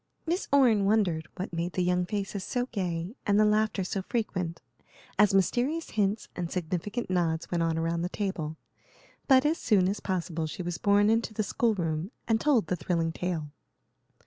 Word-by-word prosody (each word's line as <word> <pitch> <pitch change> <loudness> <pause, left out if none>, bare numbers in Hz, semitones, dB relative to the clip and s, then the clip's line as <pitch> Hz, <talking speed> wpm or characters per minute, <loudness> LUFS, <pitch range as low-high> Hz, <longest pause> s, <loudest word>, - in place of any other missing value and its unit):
Miss 345 +3 -1
Orne 240 -8 +5
wondered 190 -7 +2
what 185 -1 -5
made 170 +2 -2
the 185 - 0
young 180 0 +1
faces 200 -1 -3
so 245 +4 -1
gay 180 -2 -2
and 205 0 +4
the 215 - +6
laughter 210 -2 +2
so 190 +2 -2
frequent, 185 -6 -2 0.6
as 210 -1 +6
mysterious 245 - +1
hints 210 0 0
and 175 -2 -3
significant 185 +6 -3
nods 165 -3 0
went 175 -1 +1
on 165 -1 +1
around 165 +1 0
the 175 - -1
table; 170 -7 -3 0.7
but 265 0 +6
as 315 +3 +2
soon 195 -5 +3
as 200 +2 -1
possible 170 -4 -2
she 180 - -5
was 175 0 -4
borne 205 +1 +4
into 225 -1 0
the 215 - 0
school 225 +2 +1
room 165 -1 -2 0.2
and 225 -1 +2
told 270 - +3
the 180 - -1
thrilling 165 -1 -1
tale. 160 -4 -3
190 Hz, 180 wpm, -28 LUFS, 170-215 Hz, 0.7 s, the